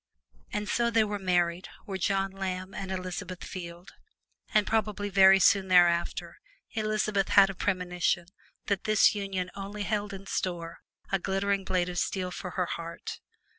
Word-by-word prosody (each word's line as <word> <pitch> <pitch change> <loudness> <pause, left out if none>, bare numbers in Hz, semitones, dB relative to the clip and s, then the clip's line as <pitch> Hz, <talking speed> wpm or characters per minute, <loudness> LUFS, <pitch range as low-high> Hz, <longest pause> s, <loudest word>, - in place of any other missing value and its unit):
And 210 0 -3
so 235 +2 +1
they 225 -1 +3
were 205 -1 -3
married, 175 -1 0 0.2
were 195 -3 -4
John 195 +1 0
Lamb 190 -1 -4
and 195 -1 -5
Elizabeth 185 -1 -5
Field; 175 0 -8 0.6
and 215 -1 +3
probably 210 -2 0
very 195 -1 +7
soon 190 +1 +4
thereafter 175 -2 +3 0.3
Elizabeth 215 -2 0
had 195 -1 +6
a - - -8
premonition 180 -2 0 0.4
that 200 -3 -1
this 215 -1 +5
union 195 -3 -3
only 200 +1 -5
held 210 -1 -2
in 195 0 -8
store 170 -3 -3 0.3
a 195 - +2
glittering 195 +1 0
blade 180 -2 +1
of 180 0 -2
steel 185 -2 -2
for 180 0 -6
her 180 - +2
heart. 170 0 -6
190 Hz, 155 wpm, -28 LUFS, 180-200 Hz, 0.6 s, very